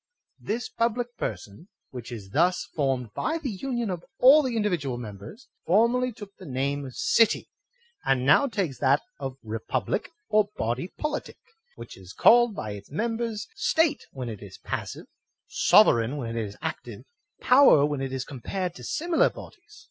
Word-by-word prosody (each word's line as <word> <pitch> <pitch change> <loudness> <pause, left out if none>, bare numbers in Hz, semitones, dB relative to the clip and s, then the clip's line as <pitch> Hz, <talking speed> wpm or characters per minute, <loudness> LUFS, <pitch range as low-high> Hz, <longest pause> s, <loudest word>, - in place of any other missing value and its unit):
This 230 +4 -3
public 240 +1 -2
person, 110 - -6 0.2
which 125 -1 -8
is 100 -5 -8
thus 175 - +2
formed 130 -7 -1
by 320 - -1
the 290 -7 -4
union 240 0 -3
of 175 -2 -5
all 275 +5 +7
the 255 -4 -2
individual 170 - -1
members, 110 - -10 0.2
for 210 +7 +5
merly 250 +1 0
took 205 -3 -12
the 190 - -11
name 140 +1 -2
of 130 - -11
city, 230 -2 +2 0.5
and 130 -1 +1
now 280 - +5
takes 195 - -3
that 140 +1 +3 0.2
of 135 -2 -5
re 110 0 -4
public - - -2 0.2
or 215 -1 +2
BODY 120 +10 -2
POLITIC, 300 -1 -4 0.4
which - - -10
is - - -12
called 240 -2 +5
by 110 - -5
its 100 -1 -9
members 225 +5 -3
State 320 -7 +1
when 130 -3 -6
it 110 -4 -7
is 100 -2 -11
passive, - - -5 0.4
sovereign 120 +5 +4
when 115 -4 -4
it 115 -2 -1
is 100 - -11
active, - - -5 0.4
POWER 250 - +6
when 145 -2 -2
it 135 -1 -3
is 130 0 -3
compared 175 +7 -4
to 125 - -12
similar 330 - +1
bodies. 420 - -14
170 Hz, 170 wpm, -26 LUFS, -, 0.5 s, all